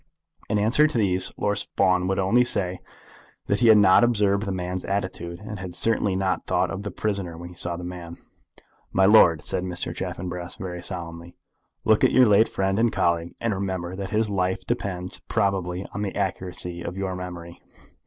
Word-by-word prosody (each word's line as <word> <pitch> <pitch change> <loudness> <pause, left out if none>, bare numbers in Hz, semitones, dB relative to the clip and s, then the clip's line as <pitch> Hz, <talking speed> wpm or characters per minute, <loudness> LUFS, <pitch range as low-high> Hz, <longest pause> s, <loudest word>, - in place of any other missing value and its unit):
In - - +1
answer 115 +9 +4
to 150 - -3
these 95 -4 +2
Lord 105 0 0
Fawn 90 -1 +3
would 95 - 0
only 105 +6 +3
say 95 -6 -1 0.7
that 100 - 0
he 120 - +4
had 110 -1 +8
not 100 +1 +6
observed 105 -3 +2
the - - -1
man's 90 0 -3
attitude, 90 -3 -3
and 105 0 -7
had 90 -2 -7
certainly 105 -3 +1
not 95 -2 -1
thought - - +1
of 95 - -4
the 105 - -4
prisoner 95 -4 -3
when 85 +1 -8
he 90 - -13
saw 85 0 -3
the 90 - -7
man. 85 -1 -7 0.7
"My 95 - +3
lord," 90 -6 +6
said 90 - -2
Mr. 90 -1 -3
Chaffanbrass, 90 0 -5
very 90 -2 -6
solemnly, 85 -1 -6 0.5
"look 110 -1 +4
at - - +5
your 130 - +7
late 105 +1 +5
friend 95 +1 0
and 115 0 +3
colleague, 85 -2 0
and 115 -2 0
remember 95 -2 -3
that 100 0 -5
his 110 +1 +1
life 95 -2 -1
depends 90 -2 -3
probably 95 -2 -1
on 100 - -4
the 100 -2 -3
accuracy 90 -2 -3
of 85 +2 -6
your 95 -1 -2
memory. 90 -2 -8
95 Hz, 190 wpm, -24 LUFS, 90-100 Hz, 0.7 s, had